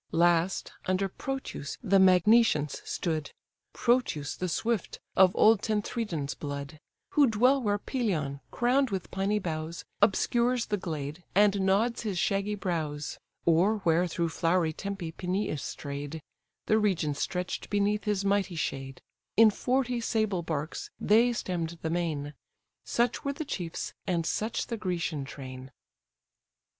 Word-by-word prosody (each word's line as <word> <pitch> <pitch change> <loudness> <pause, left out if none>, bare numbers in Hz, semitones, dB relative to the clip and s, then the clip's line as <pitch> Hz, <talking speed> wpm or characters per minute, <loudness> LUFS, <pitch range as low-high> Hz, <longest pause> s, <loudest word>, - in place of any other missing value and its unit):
Last, 175 +2 +2 0.2
under 185 +1 +1
Prothous 265 - -5
the 195 -3 +4
Magnesians 185 - +4
stood, 155 -4 -3 0.4
(Prothous 235 - +1
the 185 - -3
swift, 225 +3 -1 0.2
of 185 -1 +7
old 215 -2 +5
Tenthredon's 210 - -2
blood;) 145 +1 -6 0.3
Who 290 -2 +5
dwell 250 +5 +3
where 205 -3 +1
Pelion, 180 - -2
crown'd 255 +2 +2
with 190 -3 -4
piny 195 +2 0
boughs, 165 -3 -4 0.2
Obscures 235 +4 +3
the 210 - -1
glade, 155 -2 -5
and 200 0 +4
nods 200 +5 +2
his 205 -5 -2
shaggy 200 +3 0
brows; 160 -6 -3 0.3
Or 175 +6 +4
where 170 +2 +3
through 170 0 -1
flowery 165 0 +1
Tempe 195 -2 -5
Peneus 180 -2 -2
stray'd: 145 +2 -5 0.5
(The 215 - +3
region 180 -8 +1
stretch'd 180 +5 -3
beneath 205 +1 +1
his 205 -2 0
mighty 195 -2 +1
shade:) 135 -3 -4 0.3
In 225 -1 +8
forty 250 +1 0
sable 215 -5 0
barks 155 -2 -4
they 230 +4 +4
stemm'd 170 -7 -3
the 160 - -1
main; 155 -4 -2 0.5
Such 240 0 0
were 280 - -1
the 315 +2 -5
chiefs, 175 - -4
and 170 -3 0
such 220 +7 -1
the 230 - -4
Grecian 170 -7 -2
train. 130 -1 -8
185 Hz, 135 wpm, -29 LUFS, 160-215 Hz, 0.5 s, In